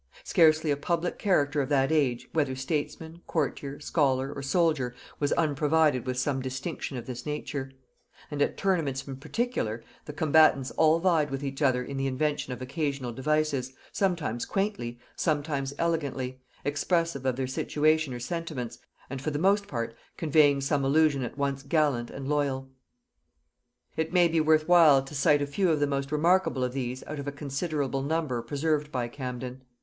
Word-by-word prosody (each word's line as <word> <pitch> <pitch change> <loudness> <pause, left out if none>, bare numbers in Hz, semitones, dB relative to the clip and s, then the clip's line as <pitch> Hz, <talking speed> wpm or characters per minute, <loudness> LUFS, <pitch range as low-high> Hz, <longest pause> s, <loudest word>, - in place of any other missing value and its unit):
Scarcely 160 - +4
a 140 - +1
public 170 +3 -1
character 145 -7 +2
of 135 - -3
that 135 0 +2
age, 135 -6 +1
whether 145 -5 +1
statesman, 160 +4 -4
courtier, 145 -2 -2
scholar, 140 -3 +1
or 140 - -6
soldier, 135 -4 +1 0.2
was 145 -1 0
unprovided 150 -3 +2
with 125 0 -2
some 135 +1 0
distinction 135 +2 -4
of 120 - -6
this 125 -1 -6
nature; 145 -2 -4 0.6
and 145 -1 -3
at - - +1
tournaments 155 -9 0
in 135 -1 -6
particular, 150 - -2 0.2
the 150 - -7
combatants 150 -3 +4
all 160 0 +4
vied 165 -4 +2
with 135 +1 -4
each 135 +1 -4
other 130 -3 +3
in 135 +2 -6
the 135 0 0
invention 135 +1 -1
of 125 0 -5
occasional 135 -2 -2
devices, 140 -1 0 0.2
sometimes 170 - -1
quaintly, 195 - -2 0.2
sometimes 145 -3 -1
elegantly, 135 -6 -2 0.2
expressive 165 0 0
of 130 -2 +1
their 130 0 -1
situation 155 +3 +1
or 120 - -5
sentiments, 155 -3 -4 0.3
and 135 0 -6
for 155 - -1
the 145 - -2
most 200 +5 +2
part 115 - -3 0.2
conveying 145 -3 +4
some 140 0 0
allusion 145 0 +3
at 125 +2 -5
once 140 -1 -1
gallant 140 -5 +1
and 135 -1 -7
loyal. 135 -2 -1 1.2
It 160 0 -1
may 180 -1 +5
be 165 -1 +2
worth 155 0 +3
while 160 -6 +7
to 135 - -11
cite 145 +1 +3
a - - 0
few 180 +6 0
of 155 -2 +2
the 145 - +3
most 140 0 -2
remarkable 165 -3 +2
of 125 0 -1
these 130 -1 -3
out 155 -1 -6
of 140 - -6
a - - -1
considerable 140 -1 -2
number 145 -4 -1
preserved 150 +2 -1
by 125 -3 -1
Camden. 125 0 -6
145 Hz, 170 wpm, -28 LUFS, 135-160 Hz, 1.2 s, while